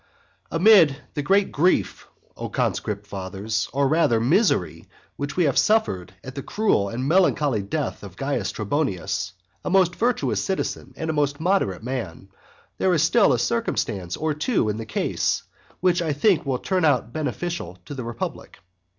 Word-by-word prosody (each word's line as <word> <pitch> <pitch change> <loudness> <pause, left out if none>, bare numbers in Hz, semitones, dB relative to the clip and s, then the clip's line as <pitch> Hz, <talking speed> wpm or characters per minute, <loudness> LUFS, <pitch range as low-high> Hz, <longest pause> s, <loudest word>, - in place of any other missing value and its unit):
I. - - -4
AMID 170 -5 +6 0.2
the 145 - -2
great 195 +6 +2
grief, 175 +6 +1 0.3
O - - -5
conscript 105 -1 -2
fathers, 100 +2 -3
or 140 +1 +2
rather 140 -6 +3
misery 145 - +1 0.3
which 145 +3 -5
we 180 - +4
have 140 -4 +3
suffered 95 - +1
at 130 - -8
the 140 - -5
cruel 165 - +1
and 125 +4 -3
melancholy 150 - +3
death 100 - -3
of - - -11
Caius - - -1
Trebonius, 95 - -2 0.3
a - - -2
most 180 -2 +3
virtuous 240 +1 0
citizen 190 - -3
and 160 0 -2
a - - -3
most 145 -1 0
moderate 160 - 0
man, 115 -7 -5 0.5
there 185 -2 +3
is 155 - +3
still 200 +6 +4
a - - +3
circumstance 100 - -1
or 155 -1 0
two 150 - 0
in 105 - -2
the 115 -1 -6
case 105 - -1 0.4
which 180 -1 +3
I 160 -3 0
think 160 0 +2
will 130 -2 +1
turn 185 +6 -1
out 125 -6 +2
beneficial 155 - -3
to - - -7
the 130 -3 -5
republic. 115 0 -6
145 Hz, 170 wpm, -24 LUFS, 110-180 Hz, 0.5 s, AMID